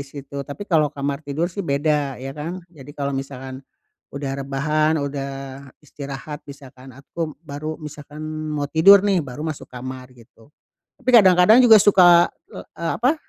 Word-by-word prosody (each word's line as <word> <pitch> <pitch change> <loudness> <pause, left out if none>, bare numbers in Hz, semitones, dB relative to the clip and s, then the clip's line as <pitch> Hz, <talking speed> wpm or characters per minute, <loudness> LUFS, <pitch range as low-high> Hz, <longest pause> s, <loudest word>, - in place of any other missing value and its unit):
situ. 140 0 -8
Tapi 140 +8 -8
kalau 160 -6 +2
kamar 140 0 -4
tidur 155 +4 -3
sih, 200 - -5
beda, 145 -3 -1
ya 135 +2 -7
kan. 165 +5 -7
Jadi 145 -4 -14
kalau 140 -1 -2
misalkan 135 -1 -6 0.6
udah 140 -1 -4
rebahan, 150 +3 0
udah 140 -2 -3 0.6
istirahat, 140 +1 -8
misalkan 130 -2 -13
aku, 155 +3 -6
baru 155 +1 -6
misalkan 150 0 -10 0.3
mau 150 -1 -2
tidur 190 +7 +6
nih, 195 -3 +2
baru 145 0 -7
masuk 155 -3 -6
kamar, 130 0 -8
gitu. 115 +1 -20 0.5
Tapi 255 - -3
kadang-kadang 190 +3 +6
juga 225 -3 +8
suka 175 -4 +6 0.2
l - - -9 0.2
eee, 165 -1 -3
apa, 255 +6 +2
145 Hz, 155 wpm, -21 LUFS, 135-165 Hz, 0.6 s, juga